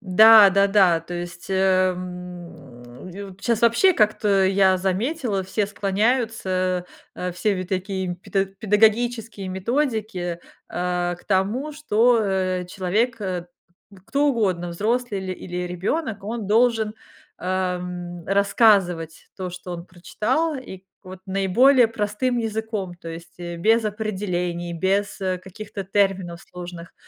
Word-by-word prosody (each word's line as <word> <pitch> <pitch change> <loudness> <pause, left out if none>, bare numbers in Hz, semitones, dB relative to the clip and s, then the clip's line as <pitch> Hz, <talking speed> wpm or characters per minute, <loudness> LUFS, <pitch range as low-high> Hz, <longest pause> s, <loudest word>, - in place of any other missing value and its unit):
Да-да-да, 200 -2 +6
то 175 +2 -8
есть, 175 0 -7
эм, 180 -8 -2
ю 195 +1 -9
щас 235 0 0
вообще, 235 +12 +5
как-то 210 - +2
я 190 0 +4
заметила, 200 - -1
все 205 +2 -1
склоняются, 195 -3 0 0.3
э, 180 - -3
все 185 +1 -1
такие 185 0 -3
педа 195 +2 -1
педагогические 215 +2 +1
методики, 200 - -2 0.3
э, 175 0 -1
к 175 - -21
тому, 210 +10 0
что, 245 -5 +3
э, 185 -3 -1
человек, 205 +6 -1
э, 180 -3 -3 0.6
кто 285 +2 +1
угодно, 190 -9 0
взрослый 215 +3 -1
или 185 -1 -4
или 180 0 -5
ребёнок, 200 - -3
он 220 0 -4
должен, 225 -1 +2 0.4
эм, 180 -1 -3
рассказывать 195 -5 +2
то, 185 -2 -4
что 180 0 -9
он 170 0 -7
прочитал, 245 - -1
и 250 -7 -9
к - - -30 0.2
вот 185 0 -9
наиболее 225 +7 +4
простым 230 +3 -1
языком, 220 -4 -3
то 170 -1 -10
есть, 165 0 -9
э, 175 -1 -6
без 220 +5 +3
определений, 185 -5 -3
без, 195 +5 -1
э, 185 -1 -1
каких-то 195 +2 -8
терминов 190 -3 0
сложных, 175 -1 -10
190 Hz, 120 wpm, -23 LUFS, 180-220 Hz, 0.6 s, Да-да-да